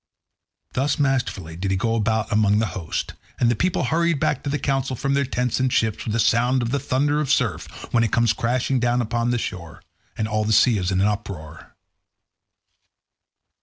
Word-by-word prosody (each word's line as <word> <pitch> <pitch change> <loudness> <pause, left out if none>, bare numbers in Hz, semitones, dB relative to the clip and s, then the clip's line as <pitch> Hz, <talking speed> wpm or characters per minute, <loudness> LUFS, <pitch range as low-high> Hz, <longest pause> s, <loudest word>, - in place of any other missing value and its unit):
Thus 140 +4 0
masterfully 125 - -1
did 95 +3 -3
he 95 - +1
go 115 +3 0
about 110 0 0
among 105 -1 +3
the 110 - +2
host, 85 -5 -4 0.3
and 120 -1 +3
the - - +1
people 185 +9 0
hurried 165 +4 +1
back 135 - 0
to 145 - -4
the 145 - 0
council 135 -2 -1
from 135 +3 -1
their 140 0 +2
tents 125 -1 -1
and 130 0 +1
ships 110 -2 0
with 110 - -1
a - - 0
sound 120 +3 +2
as 115 - -2
the 140 +3 0
thunder 145 +2 0
of 145 - -3
surf - - 0 0.3
when 115 - +4
it 115 - 0
comes 115 -2 +3
crashing 125 +3 0
down 120 +1 +1
upon 120 +1 -1
the 120 - +1
shore, 85 -7 -6 0.3
and 110 - -1
all 110 0 0
the 110 +1 0
sea 110 0 +4
is 90 -1 -1
in 95 0 +1
an 100 - +3
uproar. 95 -7 -6
115 Hz, 205 wpm, -23 LUFS, 105-130 Hz, 0.3 s, when